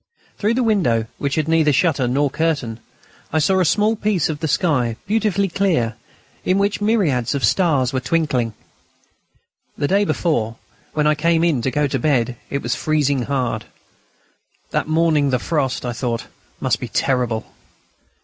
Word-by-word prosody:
Through 215 +3 +1
the 255 - +1
window, 165 - +2
which 140 -1 -1
had 155 -1 0
neither 160 -2 +3
shutter 140 -3 +2
nor 140 +3 +1
curtain, 145 -9 -1 0.5
I 160 - 0
saw 190 +5 +3
a 185 - +3
small 210 +6 +2
piece 205 -7 0
of 150 -2 -3
the 160 - -2
sky, 135 -7 +1
beautifully 200 -1 +1
clear, 165 - 0 0.5
in 185 - +2
which 200 +1 0
myriads 165 - +1
of 140 - +1
stars 145 -9 +2
were 130 - +1
twinkling. 130 -7 0 1.2
The 145 - 0
day 200 +4 +3
before, 135 - 0 0.4
when 150 -1 +1
I 150 - +4
came 165 +2 +2
in 160 -8 +2
to 130 - 0
go 145 +3 +1
to 135 -1 -1
bed, 125 -3 +1
it 140 - -3
was 120 - 0
freezing 145 -3 +1
hard. 125 -4 -2 1.1
That - - -1
morning 155 -3 +2
the 130 - +2
frost, 135 -2 -1
I 120 - -2
thought, 115 -1 -3 0.3
must - - 0
be - - -5
terrible. 125 -4 0
150 Hz, 165 wpm, -20 LUFS, 125-170 Hz, 1.2 s, I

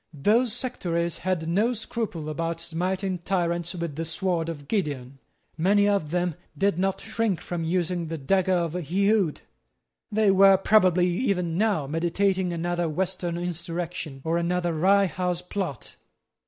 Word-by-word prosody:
Those 220 - +3
sectaries 175 -9 -2
had 180 -3 -1
no 210 +9 +2
scruple 225 -8 -4
about 165 +2 -2
smiting 185 +3 -2
tyrants 170 -1 -1
with 170 -4 -4
the 165 - -1
sword 165 0 -1
of 145 -4 -7
Gideon. 140 - -2 0.4
Many 200 +4 +4
of 200 -7 +1
them 175 +1 0 0.2
did 195 -3 +1
not 195 0 0
shrink 220 -4 -1
from 175 -2 -4
using 175 0 -1
the 165 +1 -4
dagger 185 +6 +1
of 170 -2 0
Ehud. 185 +1 +1 0.7
They 210 -1 +4
were 195 0 +7
probably 185 -3 +4
even 180 -3 0
now 200 -6 +1
meditating 180 +4 0
another 175 0 -1
Western 175 +1 -2
insurrection, 170 -4 -4
or 165 +1 +1
another 175 0 0
Rye 195 +5 +4
House 180 -1 -2
Plot. 180 - -5
175 Hz, 140 wpm, -26 LUFS, 165-195 Hz, 0.7 s, were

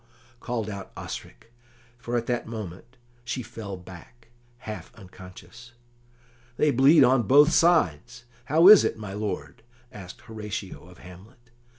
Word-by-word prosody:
called 115 -3 -4
out 100 -3 -8
Osric, - - -10 0.5
for 120 0 -3
at 120 - -3
that 120 -1 -3
moment 110 +2 -9 0.3
she 120 +2 -5
fell 100 -5 -8
back, 95 +6 -15 0.3
half 110 -4 -9
unconscious. 110 +4 -14 0.8
"They 150 - +2
bleed 140 +4 +5
on 125 -4 +2
both 145 +4 +6
sides. 120 - +1 0.2
How 160 +6 +4
is 210 -1 +9
it, - - -2
my 105 -3 -8
lord?" 105 0 -5 0.3
asked 95 -7 -12
Horatio 105 -5 -8
of 90 -1 -16
Hamlet. 110 +7 -16
115 Hz, 130 wpm, -25 LUFS, 95-125 Hz, 0.8 s, is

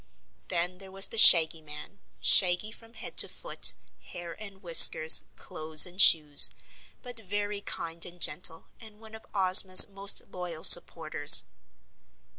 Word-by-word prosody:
Then 180 +1 -7
there 190 -1 -17
was 195 0 0
the 225 - -11
Shaggy 160 -5 +4
Man 150 +6 -14 0.2
shaggy 185 +3 0
from 225 +1 -15
head 220 - -14
to - - +3
foot, - - -2 0.3
hair 170 -1 -15
and 195 -2 -17
whiskers, 165 -2 +3
clothes 155 0 -1
and 180 +2 -4
shoes 150 -3 +1 0.5
but 245 -2 -12
very 205 0 -11
kind 165 -3 -9
and 175 0 -11
gentle 170 -2 -5
and 215 -2 -21
one 220 -1 -21
of 220 - -18
Ozma's 185 -1 +5
most 200 0 -6
loyal 175 -3 -13
supporters. 155 -4 +3
180 Hz, 140 wpm, -21 LUFS, 165-205 Hz, 0.5 s, Ozma's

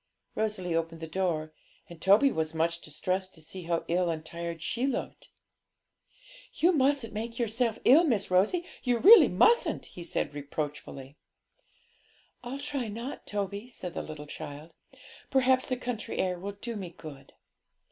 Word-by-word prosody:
Rosalie 210 -5 -2
opened 165 0 -2
the 160 - -5
door, 160 -3 -2 0.3
and 170 -2 -12
Toby 205 - +5
was 160 -3 -2
much 165 +1 0
distressed 185 +5 -2
to - - -11
see 170 +3 -8
how 170 0 -1
ill 175 +1 +1
and 160 -1 -3
tired 170 0 -5
she 230 - -1
looked. 275 - -4 1.3
'You 345 - +4
mustn't 275 - +2
make 230 +2 -4
yourself 230 -1 0
ill, 290 +7 +8
Miss 225 - 0
Rosie, 210 - +3 0.2
you 245 -2 +1
really 430 - +9
mustn't!' 475 +1 +3
he 175 - -10
said 170 - -2
reproachfully. 145 -1 -6 1.3
'I'll 245 +3 -5
try 280 -4 -3
not, 230 +6 -6
Toby,' 205 +3 -4
said 180 -8 -7
the 155 -3 -6
child; 150 +1 -8 0.6
'perhaps 260 -1 +3
the 255 - -1
country 245 -3 -4
air 180 -1 0
will 200 +2 -5
do 230 +4 -6
me 190 -4 -5
good.' 155 -5 -12
190 Hz, 150 wpm, -29 LUFS, 165-240 Hz, 1.3 s, really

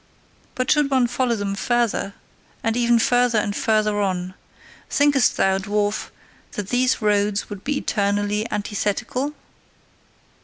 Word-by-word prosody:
But 255 0 0
should 295 -2 +3
one 260 -3 +3
follow 245 0 0
them 200 -2 -3
further 230 -2 0 0.5
and 225 0 0
ever 240 -1 +3
further 245 0 +3
and 205 -1 0
further 215 -1 +1
on, 185 -2 -2 0.6
thinkest 285 -4 +3
thou, 190 0 +2
dwarf, 205 +1 -1 0.4
that 200 -2 -5
these 250 -1 +1
roads 205 -1 +1
would 200 -1 -7
be 290 0 -1
eternally 205 0 -1
antithetical?" 215 +7 -2
215 Hz, 125 wpm, -22 LUFS, 205-245 Hz, 0.6 s, should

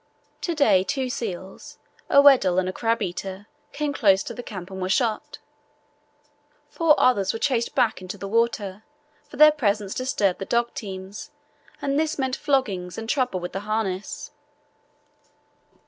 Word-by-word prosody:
To 340 - -2
day 210 -11 +4
two 260 +3 -2
seals, 190 -5 -6 0.3
a 280 - +6
Weddell 250 -11 +6
and 185 0 +2
a 185 - -3
crabeater, 200 -4 -2 0.3
came 290 0 -2
close 195 -7 +3
to - - -6
the 245 - -7
camp 190 -5 -8
and 190 0 -6
were 185 - -2
shot. 220 +1 0 1.3
Four 325 -3 +3
others 200 -7 +3
were - - -3
chased 235 -1 -1
back 230 -6 +1
into 185 +2 -7
the 195 +1 -6
water, 215 -3 0 0.5
for - - -11
their 305 0 +8
presence 210 -8 -1
disturbed 230 -8 0
the 195 - -4
dog 235 +2 0
teams, 190 -1 -7 0.5
and 280 +1 +1
this 315 0 -1
meant 265 -2 -1
floggings 205 -13 -1
and 225 0 -6
trouble 250 -7 0
with 175 0 -6
the 195 - -2
harness. 215 +6 -3
220 Hz, 155 wpm, -24 LUFS, 190-265 Hz, 1.3 s, their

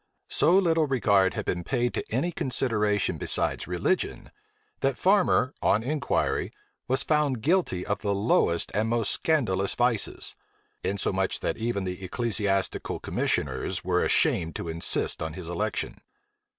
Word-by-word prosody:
So 170 +5 +4
little 165 -5 +3
regard 100 -8 +3
had - - -3
been 90 -1 -2
paid 120 +3 0
to - - -2
any 135 +10 0
consideration 105 - 0
besides - - 0
religion, - - -1 0.5
that 135 -2 0
Farmer, 185 -8 +3
on 110 - +2
inquiry, 145 +2 -1 0.4
was 130 +2 +1
found 145 -7 +1
guilty 160 - +1
of 100 - -1
the 100 -1 -1
lowest 100 -4 +1
and 110 +2 0
most 115 -3 +1
scandalous 110 -12 0
vices; 120 -3 0 0.5
insomuch 95 -1 0
that - - -1
even 115 -3 -1
the 90 +1 -5
ecclesiastical 100 -2 -1
commissioners 65 -3 -1
were - - +1
ashamed 80 -2 +1
to 85 - -4
insist 85 +1 -1
on 80 0 -3
his 90 -1 -7
election. 85 0 -3
110 Hz, 135 wpm, -27 LUFS, 95-135 Hz, 0.5 s, So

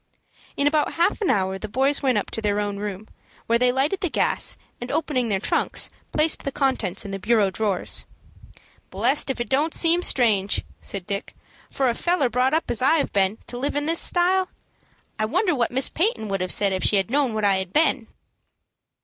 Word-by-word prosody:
In 280 - +1
about 300 0 +1
half 340 +6 +1
an 400 - +1
hour 190 -1 0
the 215 - -5
boys 270 +6 +1
went 260 -5 +2
up 205 - -3
to 225 - -4
their 205 -1 0
own 205 -1 -2
room, 205 0 -6 0.4
where 230 0 +2
they 250 0 +3
lighted 285 +10 0
the 360 - 0
gas, - - 0 0.2
and, 245 - -5
opening 290 -5 0
their 200 -3 0
trunks, - - 0 0.2
placed 310 +1 +2
the 275 - -4
contents 245 -10 -1
in 200 - -6
the 195 - -4
bureau 210 -1 +2
drawers. 200 -2 -1 0.9
"Blessed 245 +10 +1
if 270 - -2
it 240 - -2
don't 295 +4 +1
seem 340 +1 +3
strange," 215 - +2 0.2
said 195 -3 -5
Dick, 200 +1 -5 0.3
"for 270 - 0
a 240 - +2
feller 325 -1 +1
brought 255 +4 +2
up 325 - -1
as 235 - -1
I 275 +5 +4
have 295 - -2
been 195 +1 +1
to 245 - -6
live 280 +3 -2
in 290 0 0
this 330 +2 +1
style. 370 +1 +2 0.7
I 215 - +1
wonder 355 - +1
what 240 -5 +1
Miss 260 +2 0
Peyton 335 - 0
would 195 -1 -2
have 185 -1 +2
said 200 -2 +2
if 185 - -2
she - - +4
had 195 +2 0
known 270 -5 +1
what 215 -1 0
I 195 -1 +3
had 190 -1 -4
been." 275 -4 +2
245 Hz, 210 wpm, -23 LUFS, 205-290 Hz, 0.9 s, I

